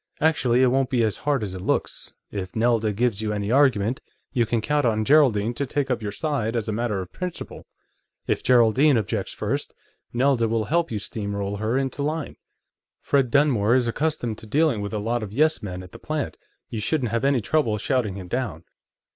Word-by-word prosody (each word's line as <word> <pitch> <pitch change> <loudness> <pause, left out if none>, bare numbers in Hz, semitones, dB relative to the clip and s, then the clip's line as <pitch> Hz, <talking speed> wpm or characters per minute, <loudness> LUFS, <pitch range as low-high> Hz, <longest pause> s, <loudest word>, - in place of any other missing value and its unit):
"Actually, 130 -6 +3
it 130 - +5
won't 135 0 +1
be 120 -3 +2
as 110 -2 0
hard 140 -6 +2
as 95 -3 -4
it 95 - -6
looks. - - -2 0.2
If 95 -3 -5
Nelda 115 -1 +2
gives 110 0 0
you 110 -1 -1
any 105 +1 -2
argument, 125 -4 +3 0.3
you 120 -4 +2
can 115 - +1
count 145 +6 0
on 110 -3 +1
Geraldine 120 -7 +4
to 140 - -2
take 140 +1 -1
your 105 -1 -3
side 120 -2 -2
as 115 -2 -1
a - - -1
matter 105 -3 -1
of 90 - -15
principle; 180 -1 -6 0.6
if - - 0
Geraldine 125 +3 +4
objects 110 -2 -2
first, - - -3 0.4
Nelda 125 -1 +2
will 110 -1 0
help 170 +6 +1
you 110 - -2
steam 100 -1 -4
roll 100 0 -3
her 110 +4 0
into 135 +1 -2
line. 155 +1 -3 0.6
Fred 135 -3 +1
Dunmore 120 -5 +3
is 125 -2 +2
accustomed 120 -4 -1
to 110 - -12
dealing 145 -2 +2
with 100 +2 -4
a - - 0
lot 115 +3 -1
of 105 -2 -6
yes 155 +5 +2
men 90 -3 -6
at 90 - -13
the - - -12
plant; 155 -2 -3 0.3
you 115 - -5
shouldn't 120 +1 0
have 115 +1 0
any 140 -2 +3
trouble 115 -2 +1
shouting 110 -3 0
him 95 -2 -7
down. 115 -8 -3
115 Hz, 205 wpm, -24 LUFS, 105-140 Hz, 0.6 s, it